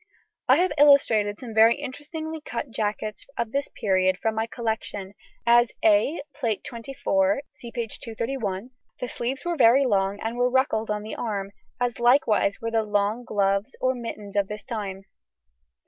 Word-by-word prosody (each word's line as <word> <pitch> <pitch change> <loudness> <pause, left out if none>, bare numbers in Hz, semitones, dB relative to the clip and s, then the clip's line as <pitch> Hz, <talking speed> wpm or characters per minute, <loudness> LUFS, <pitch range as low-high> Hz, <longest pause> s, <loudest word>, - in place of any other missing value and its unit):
I - - +7
have 365 +1 +2
illustrated 225 -8 +5
some 240 -4 -8
very 225 +2 +6
interestingly 305 +3 -6
cut 275 - -5
jackets 215 -1 -3
of 225 - -2
this 280 +2 -1
period 185 -2 +1
from 220 +3 -1
my 220 +1 -1
collection, 220 -4 -4 0.3
as 240 0 +5
A, 310 -1 +3
Plate 230 -8 -2
XXIV 230 -4 0
(see 235 - -10
p. 235 -2 -3
231); 230 -1 -4 0.3
the 250 - -3
sleeves 260 +5 -3
were 345 0 0
very 260 0 +5
long 200 -3 +1
and 225 +2 -3
were 245 0 +3
ruckled 250 -4 +1
on 210 0 -1
the 215 - -6
arm, 200 -4 -3 0.3
as 245 -1 -1
likewise 240 -5 +3
were 230 0 -3
the 225 -1 +2
long 210 +2 0
gloves 200 +2 0
or 255 0 +2
mittens 215 -5 -7
of 200 -1 +2
this 210 0 -7
time. 205 -6 -5
230 Hz, 165 wpm, -25 LUFS, 205-255 Hz, 0.3 s, I